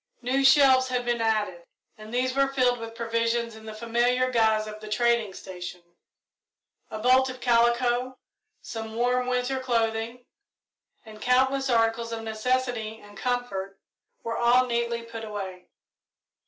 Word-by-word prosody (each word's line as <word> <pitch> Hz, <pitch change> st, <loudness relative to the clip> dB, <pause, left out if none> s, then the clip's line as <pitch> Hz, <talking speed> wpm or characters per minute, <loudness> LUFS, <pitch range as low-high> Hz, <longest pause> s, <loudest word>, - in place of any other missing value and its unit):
New 265 Hz, +3 st, +1 dB
shelves 270 Hz, -1 st, +6 dB
had 250 Hz, -1 st, -2 dB
been 240 Hz, -1 st, 0 dB
added, 210 Hz, -6 st, 0 dB, 0.3 s
and 215 Hz, 0 st, -12 dB
these 255 Hz, +1 st, 0 dB
were 275 Hz, 0 st, +3 dB
filled 255 Hz, -3 st, +1 dB
with 230 Hz, 0 st, -8 dB
provisions 230 Hz, 0 st, -1 dB
in 220 Hz, 0 st, -12 dB
the 220 Hz, -, -6 dB
familiar 240 Hz, +3 st, +1 dB
guise 220 Hz, -2 st, +2 dB
of 215 Hz, 0 st, -8 dB
the 215 Hz, -, -10 dB
trading 235 Hz, -1 st, +1 dB
station. 180 Hz, -2 st, -8 dB, 1.1 s
A 215 Hz, -, -5 dB
bolt 255 Hz, +4 st, +4 dB
of 255 Hz, 0 st, -7 dB
calico, 240 Hz, +1 st, +2 dB, 0.5 s
some 225 Hz, -1 st, -6 dB
warm 250 Hz, +1 st, +1 dB
winter 250 Hz, +1 st, 0 dB
clothing, 235 Hz, -1 st, -1 dB, 0.8 s
and 215 Hz, -1 st, -12 dB
countless 265 Hz, +2 st, +2 dB
articles 230 Hz, -1 st, +1 dB
of 225 Hz, -1 st, -4 dB
necessity 225 Hz, 0 st, -1 dB
and 205 Hz, 0 st, -15 dB
comfort 195 Hz, -5 st, -3 dB, 0.5 s
were 230 Hz, 0 st, -3 dB
all 245 Hz, +2 st, +4 dB
neatly 235 Hz, -1 st, -1 dB
put 230 Hz, -1 st, -8 dB
away. 190 Hz, -4 st, -7 dB
235 Hz, 140 wpm, -26 LUFS, 220-250 Hz, 1.1 s, shelves